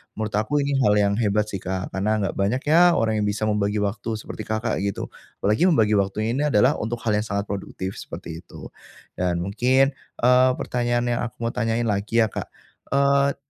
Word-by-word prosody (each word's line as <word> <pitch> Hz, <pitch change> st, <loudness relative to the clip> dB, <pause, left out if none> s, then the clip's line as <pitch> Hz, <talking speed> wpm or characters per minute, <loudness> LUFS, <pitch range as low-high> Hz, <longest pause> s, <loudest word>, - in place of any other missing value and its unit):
menurut 110 Hz, -1 st, -3 dB
aku 110 Hz, +8 st, +1 dB
ini 140 Hz, -, -1 dB
hal 105 Hz, -, +4 dB
yang 100 Hz, -1 st, +3 dB
hebat 105 Hz, -1 st, +1 dB
sih 95 Hz, -, -4 dB
Kak, 95 Hz, +1 st, -4 dB
karena 100 Hz, +3 st, -1 dB
nggak 95 Hz, -, -1 dB
banyak 105 Hz, +7 st, +1 dB
ya 175 Hz, +2 st, +6 dB
orang 110 Hz, -1 st, +1 dB
yang 105 Hz, -, 0 dB
bisa 105 Hz, +1 st, -2 dB
membagi 105 Hz, -1 st, 0 dB
waktu 105 Hz, +2 st, -2 dB
seperti 110 Hz, 0 st, -8 dB
Kakak 110 Hz, +1 st, -1 dB
gitu, 100 Hz, 0 st, -3 dB, 0.3 s
apalagi 105 Hz, -, +3 dB
membagi 110 Hz, -, +3 dB
waktunya 100 Hz, +3 st, 0 dB
ini 135 Hz, +5 st, 0 dB
adalah 130 Hz, +1 st, +3 dB
untuk 115 Hz, +2 st, -4 dB
hal 115 Hz, -, +1 dB
yang 105 Hz, -, -3 dB
sangat 100 Hz, -2 st, -2 dB
produktif, 95 Hz, -1 st, -5 dB
seperti 80 Hz, -1 st, -8 dB
itu. 90 Hz, -, -11 dB, 0.5 s
Dan 90 Hz, -1 st, 0 dB
mungkin, 130 Hz, +8 st, +2 dB, 0.3 s
eee, 125 Hz, +1 st, +6 dB
pertanyaan 120 Hz, -1 st, -1 dB
yang 120 Hz, -, 0 dB
aku 120 Hz, -, -8 dB
mau 115 Hz, -, 0 dB
tanyain 115 Hz, -1 st, -1 dB
lagi 110 Hz, +1 st, +1 dB
ya 110 Hz, -, -2 dB
Kak. -, -, -5 dB, 0.5 s
Eee, 140 Hz, 0 st, +3 dB
110 Hz, 195 wpm, -23 LUFS, 100-120 Hz, 0.5 s, ya